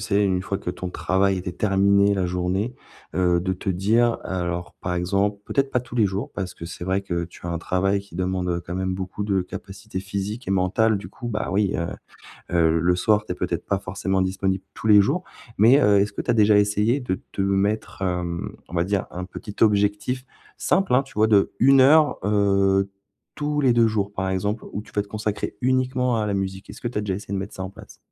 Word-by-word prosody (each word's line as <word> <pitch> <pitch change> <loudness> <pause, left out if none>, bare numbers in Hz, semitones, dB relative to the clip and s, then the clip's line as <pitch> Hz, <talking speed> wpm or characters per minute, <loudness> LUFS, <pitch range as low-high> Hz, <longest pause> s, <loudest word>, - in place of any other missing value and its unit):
sais, 105 -1 +1
une 95 -2 +1
fois 95 +1 -3
que 90 - -4
ton 90 - -5
travail 95 +2 +1
était 90 0 -4
terminé, 100 +1 +3
la 95 -2 0
journée, 90 +6 -1 0.4
heu, 90 0 +2
de 95 +1 -1
te 95 +2 -5
dire 110 +6 +2
alors 85 -1 -3
par 90 0 -2
exemple, 100 +3 0
peut-être 135 0 0
pas 125 - +1
tous 125 0 -9
les 110 -3 +4
jours 95 +2 -4
parce 95 -3 -5
que - - -9
c'est 85 +1 -8
vrai 95 +2 0
que 85 -3 -2
tu 85 +1 -11
as - - -2
un 85 - -2
travail 95 +3 0
qui 100 -4 -13
demande, 90 0 -1
heu, 85 0 -1
quand 90 - -4
même 95 0 -1
beaucoup 95 +2 -5
de 100 -2 +1
capacités 95 +2 -7
physiques 100 +4 -4
et - - -1
mentales 100 +4 +2
du 100 - -8
coup, 120 - -7
bah, 105 -2 -2
oui, 100 0 +1
heu 85 +1 -2 0.7
heu, 85 -1 +4
le 90 +2 +2
soir, 105 +2 +3
tu - - -5
es - - -2
peut-être 85 -1 -3
pas 100 - 0
forcément 95 0 -1
disponible 95 0 -1
tous 110 - -5
les 105 -1 +8
jours. 150 - +2 0.3
Mais 120 +7 +6
heu, 105 -1 +5
est-ce 105 +1 0
que - - -4
tu - - -11
as 120 - +5
déjà 105 -2 +5
essayé 105 +6 +2
de 110 -7 -3
te - - -3
mettre, 100 +2 0
hem, 90 -2 -2
on 85 - -14
va 85 - +2
dire 100 +1 -1
un 90 +1 -5
petit 100 +2 -9
objectif 105 +4 +2 0.3
simple, 190 -9 +1
hein, 135 - +5
tu 135 - -17
vois, 110 +1 +3
de 105 -3 +3
1 135 +2 +6
heure, 150 +3 +6
heu, 100 -1 +2 0.5
tous 150 0 -1
les 130 -3 +4
2 115 -1 +4
jours 105 -2 -1
par 95 -1 -3
exemple 105 +4 -2
où 105 - -3
tu - - -17
vas 105 - +1
te 100 - -9
consacrer 105 0 -3
uniquement 130 -1 +1
à - - 0
la 100 - -1
musique. 95 0 -3
Est-ce - - -10
que 120 - -2
tu 115 - -5
as - - +1
déjà 100 -2 -2
essayé 100 0 -7
de - - 0
mettre 100 +1 -6
ça 95 - -5
en 95 - -5
place? 100 - -14
100 Hz, 235 wpm, -23 LUFS, 95-105 Hz, 0.7 s, les